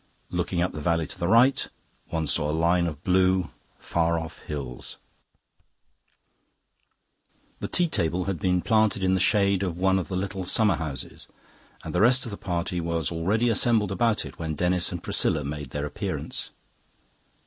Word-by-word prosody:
Looking 90 0 0
up 90 - -2
the 75 - -5
valley, 85 +1 +1
to - - -8
the 85 - 0
right, 120 +7 +4 0.4
one 80 -1 -2
saw 75 0 +1
a - - +1
line 85 +2 +2
of 75 -2 -6
blue, 95 -1 +2 0.3
far 85 0 0
off 80 -1 -6
hills. 65 -5 -7 2.6
The - - -3
tea 175 - +2
table 90 - 0
had 95 -2 -3
been 90 -1 +1
planted 110 -3 +2
in 95 0 +3
the 95 - +2
shade 100 -2 +3
of 90 -3 -2
one 95 +1 +3
of 90 - -4
the 90 - -3
little 95 0 -3
summer 105 +3 +2
houses, 70 -6 -6 0.6
and - - -6
the - - +2
rest 125 +4 +5
of 115 - -6
the - - -4
party 90 -1 -2
was 85 -2 -1
already 100 +8 +1
assembled 110 -3 +2
about 110 +3 +1
it - - -11
when 80 -2 -3
Denis 90 +1 0
and 85 -1 -5
Priscilla 75 - 0
made 75 -1 -5
their 75 +2 -3
appearance. 75 - -4
90 Hz, 170 wpm, -26 LUFS, 80-100 Hz, 2.6 s, rest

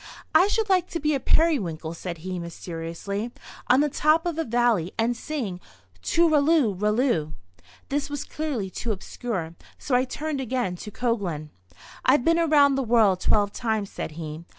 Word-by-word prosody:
"I 370 - +6
should 440 +1 0
like 370 -3 +3
to 335 - -3
be 300 0 +1
a 275 - +1
periwinkle," 190 - +1
said 170 0 -6
he, 185 -1 -3
mysteriously, 170 +6 -5 0.4
"on 255 +3 +5
the 300 - +3
top 305 +3 +2
of 335 -2 -2
a - - +2
valley, 235 - +1
and 230 +2 +1
sing 230 -10 -4 0.4
tooralloo 310 - +3
ralloo." 210 - +1 0.5
This 285 +1 -1
was 290 -1 -3
clearly 270 -12 -3
too 235 - -3
obscure, 190 -4 -4 0.2
so 275 - -4
I 250 +1 +4
turned 295 +1 -3
again 245 -7 -1
to 210 - -8
Coglan. 195 -11 -2 0.5
"I've 260 -1 +4
been 330 0 +4
around 295 -4 +5
the 270 - 0
world 220 -6 +4
twelve 205 +1 +2
times," 220 -4 -2
said 155 - -5
he. 155 0 -7
240 Hz, 165 wpm, -25 LUFS, 185-295 Hz, 0.5 s, I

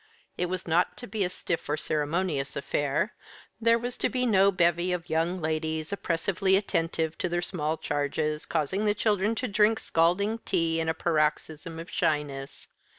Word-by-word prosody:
It 180 - -1
was 185 0 -4
not 170 +2 +2
to 245 - -7
be 220 -4 -2
a 180 - 0
stiff 170 -3 -4
or 150 - +1
ceremonious 150 -1 -1
affair. 145 +6 0 0.5
There 230 +1 +5
was 245 +1 -4
to - - +1
be 250 -1 0
no 200 -4 +5
bevy 175 0 +2
of 175 -2 -3
young 165 +3 +1
ladies, 160 +1 -2
oppressively 190 +1 +1
attentive 165 -4 -1
to 185 - -1
their 175 0 -1
small 160 -3 -1
charges, 150 +1 -1
causing 170 +6 0
the 210 0 +2
children 210 0 +1
to 250 - -2
drink 215 +1 +3
scalding 190 +7 +1
tea 165 -6 0
in 160 0 0
a 160 - 0
paroxysm 160 0 -1
of 165 +2 -8
shyness. 150 -6 -2
170 Hz, 170 wpm, -28 LUFS, 155-195 Hz, 0.5 s, There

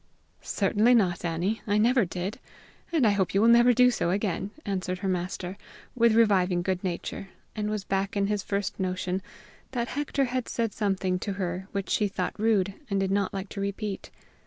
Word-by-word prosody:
"Certainly 230 +3 +3
not, 180 -6 +2
Annie; 175 +6 -1
I 205 0 +2
never 235 +1 +4
did. 180 +3 -4 0.5
And 315 -7 +3
I 210 - +5
hope 195 -2 0
you 200 - +4
will 225 - +5
never 235 +1 +7
do 250 +1 +5
so 215 - 0
again," 195 0 -1 0.2
answered 185 -2 -2
her - - +1
master, 180 +1 -3 0.3
with 230 -2 +4
reviving 190 -6 +3
good 185 0 -1
nature, 185 +1 -4 0.3
and 210 -1 -2
was 210 -2 -2
back 195 +1 -1
in 200 - +2
his 205 0 0
first 200 +1 -3
notion, 185 0 -1 0.5
that 235 -2 -1
Hector 285 -1 0
had 250 -1 -3
said 230 -3 -1
something 190 -3 0
to 200 +1 -3
her 185 -1 -3
which 200 -1 -3
she 210 - +2
thought 185 -2 -3
rude 205 -3 +2 0.2
and 200 -1 +1
did 195 0 0
not 200 -1 +1
like 195 0 -5
to 200 - -5
repeat. 200 0 -4
200 Hz, 190 wpm, -27 LUFS, 185-220 Hz, 0.5 s, never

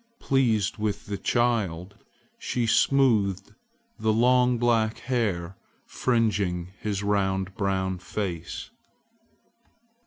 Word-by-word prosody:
Pleased 115 -7 +1
with 105 -1 -2
the 100 -1 -4
child, 105 -6 0 0.5
she 120 -2 -1
smoothed 115 -6 +2 0.5
the 110 - +2
long 125 +2 +3
black 115 -2 +1
hair 100 -8 -2 0.3
fringing 100 -8 0
his 105 -2 -3
round 95 -2 0
brown 95 -3 -1
face. 90 -3 -5
105 Hz, 90 wpm, -26 LUFS, 95-120 Hz, 0.5 s, long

